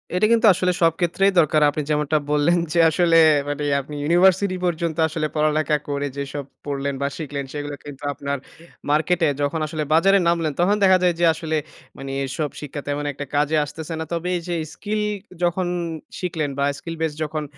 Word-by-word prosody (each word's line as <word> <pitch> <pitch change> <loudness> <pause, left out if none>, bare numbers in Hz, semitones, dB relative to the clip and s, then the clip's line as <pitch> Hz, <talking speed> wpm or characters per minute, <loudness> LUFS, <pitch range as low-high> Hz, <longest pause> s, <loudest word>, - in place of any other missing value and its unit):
এটা 185 - +3
কিন্তু 230 0 +4
আসলে 180 0 +1
সব 165 -1 +5
ক্ষেত্রেই 195 +3 +2
দরকার। 155 -1 +3
আপনি 150 +1 -2
যেমনটা 150 0 +1
বললেন 150 +4 +3 0.2
যে 170 - +2
আসলে 165 0 +3 0.3
মানে 145 +1 -3 0.2
আপনি 150 +2 -9
ইউনিভার্সিটি 185 +4 +3
পর্যন্ত 170 -2 -1
আসলে 155 -1 -2
পড়ালেখা 155 0 +2
করে 145 0 -1
যেসব 140 +1 -4 0.2
পড়লেন 140 -1 -2
বা 140 - +1
শিখলেন, 145 -3 -4
সেগুলো 145 0 -4
কিন্তু 145 -1 -10
আপনার 140 +1 -3 0.5
মার্কেটে 160 +3 +2
যখন 145 +3 0
আসলে 155 0 -3
বাজারে 195 +5 +5
নামলেন, 165 -2 +1
তখন 195 +4 +3
দেখা 190 -1 +6
যায় 175 -2 +3
যে 175 - +4
আসলে 160 0 -2 0.4
মানে 135 0 -6
এসব 150 +3 -3
শিক্ষা 145 -1 -6
তেমন 145 0 -2
একটা 145 0 -6
কাজে 150 +2 +2
আসতেছে 160 +2 -7
না। 160 - -3
তবে 170 +1 -2
এইযে 175 +1 -4 0.2
স্কিল 210 +3 -3 0.4
যখন 175 +1 +1 0.5
শিখলেন 165 -5 -2
বা 140 - +1
skill 165 +2 -6
base 155 -2 -1
যখন 155 0 -3
155 Hz, 180 wpm, -22 LUFS, 145-175 Hz, 0.5 s, দেখা